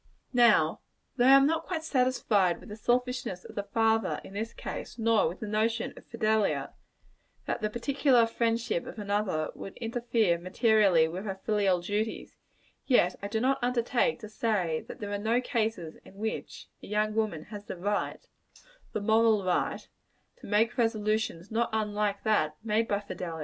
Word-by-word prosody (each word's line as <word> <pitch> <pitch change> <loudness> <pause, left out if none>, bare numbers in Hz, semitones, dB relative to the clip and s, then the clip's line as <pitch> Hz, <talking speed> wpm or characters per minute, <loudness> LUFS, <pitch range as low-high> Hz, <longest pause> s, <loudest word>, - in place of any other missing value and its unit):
Now, 230 -10 +4 0.4
though 245 -2 +2
I 270 +1 +9
am 275 - +5
not 320 +2 0
quite 325 -4 -3
satisfied 250 - +2
with - - -13
the 210 - -6
selfishness 245 -4 -1
of - - -10
the 205 - -2
father, 225 +2 +1
in - - -12
this 220 +3 -3
case - - -7
nor 230 -1 +3
with 170 - -6
the 215 - -4
notion 220 +2 0
of - - -15
Fidelia, 220 -2 0 0.7
that - - -2
the 215 - 0
particular 250 +1 +3
friendship 230 -4 -1
of - - -8
another 205 -6 -1
would 195 - -9
interfere 230 -6 0
materially 190 -2 +3
with 180 +5 -6
her 195 -2 -4
filial 200 -4 +2
duties 210 +4 -3 0.5
yet 185 -9 +4
I 200 - -3
do 220 +2 -1
not 265 +3 +1
undertake 245 +1 +1
to 215 - -7
say 205 -7 -1
that - - -9
there 205 -1 -4
are 205 - -2
no 225 +4 +1
cases 220 - -2
in - - -16
which 220 +2 -5
a - - -11
young 215 +1 0
woman 215 -8 -1
has 205 -1 -7
the - - -6
right 205 +3 -2 0.7
the 215 - -2
moral 220 -1 +3
right 180 -1 -1 0.5
to - - -12
make 225 +4 +1
resolutions 215 -5 0
not 230 +2 +1
unlike 210 -2 -1
that 155 -9 +1
made 225 +1 +1
by 205 0 0
Fidelia. 175 -5 -6
215 Hz, 170 wpm, -29 LUFS, 200-230 Hz, 0.7 s, I